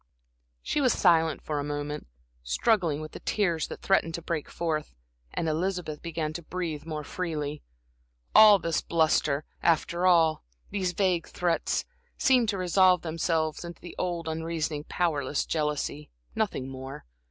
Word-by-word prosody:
She 295 - 0
was 255 -4 +4
silent 165 -4 +3
for 150 -2 -2
a - - -2
moment, 145 - -4 0.3
struggling 165 - +1
with 155 - -7
the - - -8
tears 170 -7 0
that - - -9
threatened 165 -4 +2
to 170 - -5
break 165 -3 -3
forth, 155 - -3 0.4
and 165 - -2
Elizabeth 165 -1 -2
began 160 -2 -3
to 170 - -5
breathe 165 -3 -4
more 155 -2 -4
freely. 150 -3 -4 0.7
All 215 -2 +9
this 165 -3 -1
bluster, 155 -3 +1 0.2
after 170 +2 +2
all, 165 -3 +4 0.3
these 185 -3 -1
vague 180 -3 +1
threats, 175 -2 0 0.3
seemed 255 -6 +4
to 200 - 0
resolve 185 0 +4
themselves 160 -1 -1
into 170 -1 -8
the 175 - -10
old, 170 -2 -2
unreasoning, 160 -2 -2
powerless 150 -5 0
jealousy 150 -1 -2 0.2
nothing 190 -12 -1
more. 130 - -8
165 Hz, 145 wpm, -28 LUFS, 150-180 Hz, 0.7 s, All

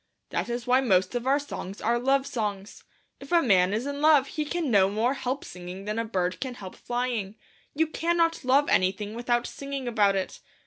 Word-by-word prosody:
That - - -2
is 240 0 -3
why 255 +1 +4
most 190 -6 +2
of 245 +1 -3
our 275 +1 +4
songs 210 -9 -6
are 235 +2 +1
love 270 +2 +2
songs. 205 -6 -4 0.4
If 275 +3 -12
a 345 - +6
man 190 - +3
is 220 +5 -1
in 285 0 -4
love 295 -3 +5
he 305 - -3
can 320 -3 -2
no 195 -3 +5
more 225 +6 +1
help 270 0 -3
singing 180 +2 -8
than 210 +2 -2
a - - 0
bird 185 -4 -1
can 255 -2 -4
help 190 -5 -9
flying. 240 -5 -3 0.4
You 320 +2 +3
cannot 330 0 0
love 270 +3 +3
anything 195 +3 +1
without 240 +1 0
singing 275 -2 -5
about 205 -4 +3
it. 190 -1 -3
240 Hz, 205 wpm, -27 LUFS, 200-275 Hz, 0.4 s, a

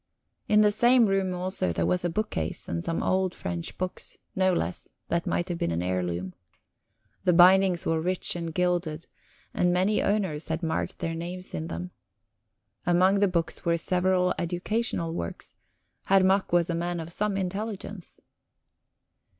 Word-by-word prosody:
In 210 0 +5
the 210 -1 +5
same 240 +3 +5
room, 195 -2 +1
also, 180 - 0
there 85 0 0
was 180 - +1
a 175 - +1
bookcase, 165 - -3
and 85 0 -3
some 165 - -2
old 185 -1 +1
French 85 -1 -4
books, 185 0 -5 0.2
no 185 0 +3
less, 90 - -2 0.2
that 170 0 0
might 175 - 0
have 175 -1 -3
been - - 0
an 85 +1 -1
heirloom. 90 0 -2 0.9
The 180 - +3
bindings 185 0 +6
were 160 0 +1
rich 180 +2 -1
and 170 -1 -4
gilded, 175 -2 -1 0.5
and 180 - +2
many 185 +4 +2
owners 190 -7 0
had 160 +2 -3
marked 160 - -2
their 165 - -3
names 175 +3 -6
in 160 - -3
them. 180 +2 -5 0.9
Among 185 +3 +3
the 200 - +4
books 170 -3 -2
were 170 0 +2
several 180 +1 +2
educational 175 0 -1
works; 85 - -5 0.5
Herr 195 -1 +4
Mack 190 +1 +2
was 175 0 +3
a - - -1
man 175 +1 -2
of 165 +1 -5
some 210 0 0
intelligence. 195 0 -4
180 Hz, 160 wpm, -27 LUFS, 165-190 Hz, 0.9 s, bindings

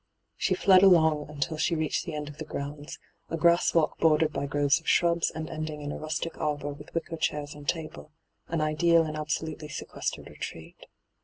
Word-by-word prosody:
She - - +1
fled 190 -2 +6
along 160 -6 +5
until 150 +2 -3
she 165 - +1
reached 155 +3 -1
the 165 - -4
end 150 -1 -4
of 150 +1 -10
the - - -3
grounds, 145 0 -6 0.3
a 165 - -2
grass 170 +2 +3
walk 165 -2 +2
bordered 155 -1 +3
by 140 +1 -2
groves 145 +1 +2
of 165 - -4
shrubs 170 -1 +3
and 160 0 -6
ending 155 -1 -5
in 145 - -4
a - - -5
rustic 155 +2 -3
arbour 145 -1 -2
with 145 - -13
wicker 165 0 -3
chairs 150 -2 -2
and 145 -1 -6
table, 160 -2 -4 0.4
an 165 -1 -1
ideal 165 +2 +3
and 155 -1 -4
absolutely 155 0 -3
sequestered - - -5
retreat. 80 -1 -9
155 Hz, 190 wpm, -28 LUFS, 150-165 Hz, 0.4 s, fled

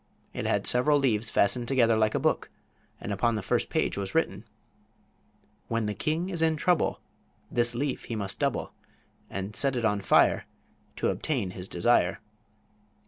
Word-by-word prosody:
It - - -3
had - - 0
several 145 +4 +3
leaves 115 -6 +1
fastened 120 +4 +2
together 115 -4 +3
like 110 -1 +2
a - - +1
book, - - 0 0.5
and 105 - -4
upon 115 +4 +1
the 105 - -3
first - - 0
page - - 0
was 100 +6 -5
written: 165 -7 0 1.2
"When 115 -1 -1
the 105 - -1
king 160 - -2
is 170 -3 -2
in 160 -1 +3
trouble 175 +1 +1 0.5
This 120 0 +1
leaf 140 +2 -2
he 115 - -4
must 100 -2 -4
double - - -1 0.6
And 100 +2 -5
set 135 -2 +3
it 120 -2 -1
on 105 -2 +1
fire - - +3 0.5
To - - 0
obtain 125 -12 -2
his 90 0 -8
desire." 95 0 +2
115 Hz, 165 wpm, -28 LUFS, 105-135 Hz, 1.2 s, several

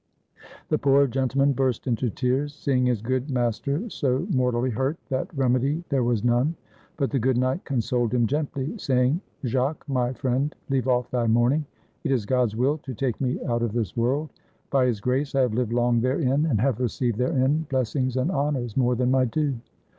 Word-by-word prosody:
The - - +1
poor 140 0 +4
gentleman 135 +2 +1
burst 130 -3 0
into 125 -1 0
tears, 135 +5 -1
seeing 130 -4 +1
his 120 -4 0
good 130 +3 -1
master 135 - -1
so 130 +2 0
mortally 125 -3 +1
hurt 130 +7 -1
that 130 -1 -2
remedy 135 +5 +1
there 135 -3 +1
was 120 -3 0
none; 120 +7 +2 0.4
but 140 -3 0
the 135 - +1
good 125 +1 +1
knight 130 +7 0
consoled 120 -3 0
him 120 -1 +2
gently, 140 - -2
saying, 130 +4 +1 0.2
"Jacques, 130 +6 -1
my 125 -3 0
friend, 135 +3 -1 0.2
leave 130 -1 +1
off 125 -1 +1
thy 120 -2 0
mourning; 120 +7 +2 0.4
it - - -1
is 120 -6 +1
God's 125 -2 +1
will 135 +6 +1
to 130 -3 -7
take 125 -1 -2
me 130 -1 0
out 120 -1 0
of 115 -3 -1
this 115 -6 -2
world; 135 +6 0 0.4
by 130 -2 +3
His 115 -4 0
grace 130 +6 -1
I 135 - +4
have 125 -4 +1
lived 120 -1 -1
long 120 -1 +2
therein, 135 +3 +1
and 120 -9 +1
have 125 0 +1
received 120 -2 -1
therein 140 +3 +1
blessings 130 0 0
and 130 +8 +1
honors 140 - -1
more 125 -2 +2
than 125 +1 +1
my 130 -1 +3
due. 145 +4 0
130 Hz, 190 wpm, -25 LUFS, 120-140 Hz, 0.4 s, poor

